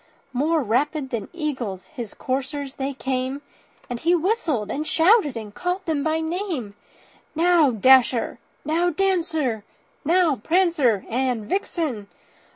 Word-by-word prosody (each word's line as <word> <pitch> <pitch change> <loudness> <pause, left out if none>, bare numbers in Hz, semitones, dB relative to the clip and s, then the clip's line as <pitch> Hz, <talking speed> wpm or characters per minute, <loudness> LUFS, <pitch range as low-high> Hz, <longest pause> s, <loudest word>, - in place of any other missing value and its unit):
More 305 +4 +1
rapid 265 +5 0
than 225 -5 -3
eagles 260 - -4
his 240 -9 -8
coursers 270 +1 -3
they 275 +1 -2
came, 260 +2 -2 0.4
And 245 -2 -4
he 340 +6 +3
whistled 325 - 0
and 305 +2 -3
shouted, 330 - +4
and 215 -2 -7
called 360 - -3
them 305 -4 0
by 320 0 0
name; 320 - -3 0.6
"Now, 335 -2 +4
Dasher! 250 +1 +4 0.3
now, 335 +3 +2
Dancer! 320 - 0 0.4
now, 335 -2 +3
Prancer 310 - +2
and 245 -2 -1
Vixen! 305 - -2
290 Hz, 125 wpm, -23 LUFS, 245-335 Hz, 0.6 s, shouted